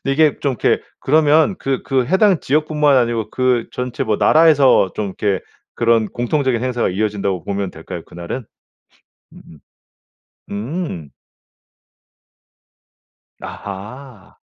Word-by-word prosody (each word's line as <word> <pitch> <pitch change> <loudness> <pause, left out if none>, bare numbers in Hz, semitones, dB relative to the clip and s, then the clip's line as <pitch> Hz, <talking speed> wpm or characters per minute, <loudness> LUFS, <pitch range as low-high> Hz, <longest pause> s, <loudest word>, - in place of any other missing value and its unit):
근데 135 - -1
이게 155 0 +3
좀 140 -2 0
이렇게 - - +2 0.2
그러면 155 +5 +3
그 135 -1 -2
그 130 -2 0
해당 190 -1 +3
지역뿐만 150 -1 +2
아니고 115 -3 0
그 125 -2 0
전체 125 -1 -3
뭐 110 -1 0
나라에서 145 - +5
좀 105 - -2
이렇게 95 0 -1 0.3
그런 115 -2 +2
공통적인 125 -1 -1
행사가 125 -2 0
이어진다고 100 -3 -2
보면 100 -1 -3
될까요 80 +1 -8
그날은? 85 +9 -7 0.9
음음. 80 - -15 0.9
음. 105 - -5 2.3
아하. 105 +3 -9
125 Hz, 250 characters per minute, -18 LUFS, 100-145 Hz, 2.3 s, 나라에서